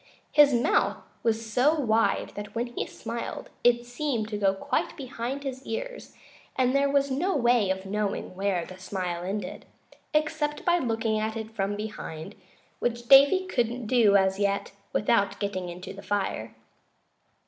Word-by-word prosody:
His 295 -1 +7
mouth 240 -2 +2 0.2
was 225 0 0
so 285 +7 +4
wide 230 -6 +1
that 205 +1 -8
when 235 +1 0
he - - -2
smiled 230 +1 -6
it 240 0 +4
seemed 245 -3 -2
to 210 - -3
go 195 -1 +3
quite 270 +7 -2
behind 260 +1 -4
his 265 -1 -5
ears, - - -6 0.4
and 255 -1 +2
there 280 0 +3
was 280 0 +2
no 355 +9 0
way 240 -6 +3
of 190 0 -2
knowing 205 -1 -2
where 190 -3 0
the 185 0 -11
smile 185 -2 -3
ended, 190 +1 -4 0.5
except 305 -1 0
by 350 0 +4
looking 225 -5 0
at 220 +1 -2
it 220 0 -6
from 205 -2 -1
behind, 205 -7 -6 0.5
which 240 0 -2
Davy 280 +9 +7
couldn't 240 -7 -1
do, 215 -3 +4
as 190 0 +3
yet, 200 0 0 0.2
without 200 -2 +2
getting 185 -3 -3
into 180 +2 -8
the 200 - -10
fire. 195 - -2
225 Hz, 160 wpm, -27 LUFS, 200-265 Hz, 0.5 s, His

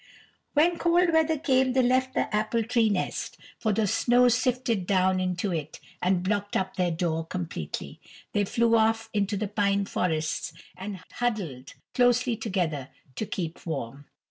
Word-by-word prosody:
When 335 +3 +3
cold 345 0 +3
weather 320 0 +3
came 260 -3 +2
they 260 0 +3
left 255 +1 +2
the - - 0
apple 215 +2 +1
tree 230 -1 +2
nest, 200 -3 -2 0.2
for 220 - +1
the 215 +1 +1
snow 245 +5 +4
sifted 245 -5 0
down 185 -1 +3
into 185 +1 -1
it 155 -2 -4 0.2
and 180 0 +1
blocked 205 +1 0
up 190 0 -2
their 180 -1 +1
door 165 -1 -1
completely. 160 - -5 0.3
They 205 -1 +2
flew 230 +3 +2
off 225 0 +2
into 205 0 0
the 210 +1 -2
pine 200 -1 +1
forests, 160 -5 -1 0.2
and 190 0 -6
huddled 190 - -3 0.2
closely 245 -1 +3
together 170 - -2 0.3
to 215 - -3
keep 170 -3 -4
warm. 140 -3 -5
205 Hz, 155 wpm, -27 LUFS, 180-245 Hz, 0.3 s, snow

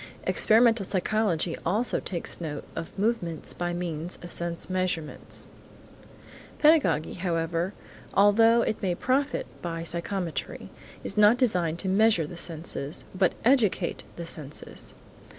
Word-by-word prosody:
Experimental 225 -1 +4
psychology 185 -3 0
also 215 +8 +1
takes 175 -1 -3
note 150 -3 -4
of 165 +3 -6
movements 195 -7 0
by 175 0 -2
means 175 -1 -3
of 175 - -8
sense 170 -1 -2
measurements. 185 -4 -2 1.1
Pedagogy, 300 - +4
however, 170 +1 -1 0.4
although 225 +4 +5
it 220 - -2
may 180 -3 0
profit 270 +8 0 0.2
by 165 -1 -4
psychometry 170 +1 -3 0.3
is 195 - -4
not 210 +3 +6
designed 180 - +1
to 190 - -3
measure 195 -3 +4
the 165 - -8
sensations, 160 -3 -3
but 185 -1 +2
educate 230 -9 +2
the 170 - -6
senses. 150 -3 -6
180 Hz, 120 wpm, -27 LUFS, 165-215 Hz, 1.1 s, not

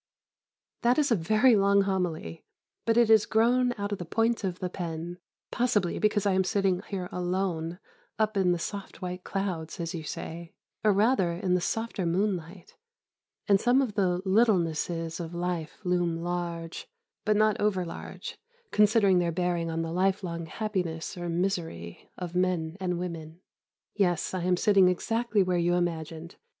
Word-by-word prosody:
That 240 +1 +3
is 290 -4 +2
a - - +6
very 215 +8 +4
long 200 0 +4
homily, 175 - -2 0.4
but 225 0 +3
it 235 -2 +5
has 220 -2 +6
grown 245 +3 +3
out 205 0 -3
of 205 - -2
the - - -3
point 225 +6 +1
of 185 -2 -2
the 185 - -3
pen, 175 -1 -5 0.3
possibly 230 -7 +1
because 210 -1 +2
I 200 - +3
am 190 0 +3
sitting 190 -1 +1
here 185 -3 -4
alone, 175 -2 -2 0.4
"up 215 -1 +1
in 190 -2 +3
the 175 - +1
soft 195 +2 -6
white 180 0 -5
clouds," 185 -4 -3
as 165 +1 -3
you 165 -2 -5
say, 165 +2 -7 0.3
or 215 - +5
rather 200 -3 +3
in 180 +1 -1
the 180 - +2
softer 225 -2 -2
moonlight; 180 -1 -2 0.7
and 200 -2 +4
some 245 +2 +4
of 255 -6 0
the 185 -3 +1
littlenesses 170 -5 +1
of 170 0 -6
life 175 -2 -3
loom 175 -2 +1
large, 170 -1 -4 0.4
but 215 0 +2
not 215 -1 +3
over 195 -4 +1
large, 165 - -8 0.3
considering 210 -3 +4
their 170 -1 +1
bearing 175 -1 -1
on 165 0 -2
the 165 - -4
lifelong 180 -2 -1
happiness, 180 -5 -3
or 175 -1 -4
misery, 165 - -3
of 180 -2 -5
men 180 -3 0
and 180 -2 -1
women. 165 -2 -6 0.5
Yes, 180 -5 0
I 185 - -2
am 180 0 +2
sitting 195 -1 +5
exactly 225 +3 +1
where 180 -1 0
you 175 +1 +2
imagined. 165 -1 -3
180 Hz, 165 wpm, -28 LUFS, 170-205 Hz, 0.7 s, a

